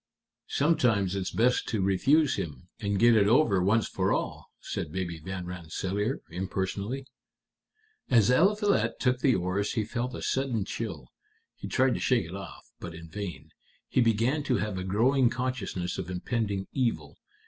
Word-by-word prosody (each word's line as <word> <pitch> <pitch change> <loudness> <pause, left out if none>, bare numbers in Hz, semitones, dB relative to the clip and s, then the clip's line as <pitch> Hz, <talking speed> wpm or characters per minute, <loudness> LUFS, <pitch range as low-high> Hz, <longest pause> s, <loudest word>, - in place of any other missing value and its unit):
"Sometimes 120 - +2
it's 95 -1 -2
best 125 +2 +2
to 110 - -1
refuse 130 - +3
him, 85 +3 -6
and 100 -1 -1
get 120 +2 +6
it 100 -2 +4
over 110 -5 +4
once 105 +4 +2
for - - 0
all," - - -2
said - - -5
Baby 85 -2 -3
Van 90 +2 -5
Rensselaer, 95 - -3
impersonally. 95 +7 -3 1.0
"As 115 -3 +5
Eliphalet 200 - +2
took 125 -1 +1
the 130 -2 +3
oars 90 +3 -1
he 110 - 0
felt 125 +3 -3
a - - -6
sudden 130 -7 0
chill. 85 - -5 0.5
He - - -7
tried 130 -1 +2
to - - -2
shake 125 -6 +2
it 85 +4 -8
off, 100 0 -10
but 85 -2 -7
in 85 0 -10
vain. 100 -1 -6 0.4
He - - +3
began 115 +6 +2
to 130 - +2
have 100 -1 -2
a - - -3
growing 120 +7 +3
consciousness 125 -9 -3
of 90 -1 -5
impending 100 +1 -2
evil. 125 -4 -2
105 Hz, 160 wpm, -28 LUFS, 95-125 Hz, 1.0 s, get